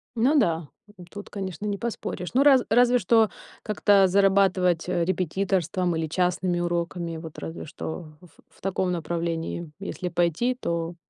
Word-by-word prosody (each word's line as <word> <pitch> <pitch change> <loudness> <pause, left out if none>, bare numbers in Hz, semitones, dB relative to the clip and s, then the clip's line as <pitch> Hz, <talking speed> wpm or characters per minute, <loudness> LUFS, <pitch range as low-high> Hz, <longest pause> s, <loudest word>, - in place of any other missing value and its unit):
Ну 260 +7 +3
да, 165 - +1 0.4
тут, 205 0 -9
конечно, 190 -1 -5
не 205 -1 -1
поспоришь. 210 -5 -5
Ну, 265 +3 +4
раз 270 -4 +6
разве 245 +2 +5
что 220 +2 +4 0.3
как-то 205 -2 +4
зарабатывать 190 -3 +3
репетиторством 180 0 0
или 160 0 -1
частными 180 +1 0
уроками, 170 -1 -2
вот 160 -1 -9
разве 160 - -6
что 160 -1 -7
в 180 - -16 0.2
в - - -25
таком 190 -1 -1
направлении 170 -1 -3
если 190 -2 -4
пойти, 175 +9 +1
то 170 -3 -2
180 Hz, 140 wpm, -25 LUFS, 170-200 Hz, 0.4 s, раз